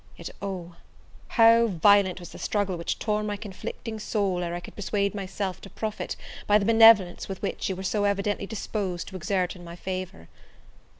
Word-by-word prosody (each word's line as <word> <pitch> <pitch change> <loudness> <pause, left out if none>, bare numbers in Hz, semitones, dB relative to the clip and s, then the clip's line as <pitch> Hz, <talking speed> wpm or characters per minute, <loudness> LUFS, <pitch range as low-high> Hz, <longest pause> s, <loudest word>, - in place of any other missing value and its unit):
Yet, - - -7
oh! 180 -4 -5 0.5
how 230 0 +6
violent 200 0 +4
was 175 - -10
the - - -10
struggle 200 -3 -1
which 170 0 -3
tore 210 -1 0
my 210 -1 -3
conflicting 215 +2 -7
soul 200 -4 -1
ere 175 0 -3
I - - -3
could 175 - -12
persuade 200 -1 -1
myself 195 -1 -4
to 195 - -10
profit 215 +2 -4 0.3
by 210 - +6
the 200 - -1
benevolence 225 -5 +6
which 190 +1 -3
you 190 - -1
were 190 - -6
so 205 +2 0
evidently 200 0 0
disposed 200 -4 -3
to 190 - -11
exert 185 +1 -1
in 175 - -12
my 170 0 -9
favour! 185 - -6
195 Hz, 180 wpm, -26 LUFS, 180-210 Hz, 0.5 s, how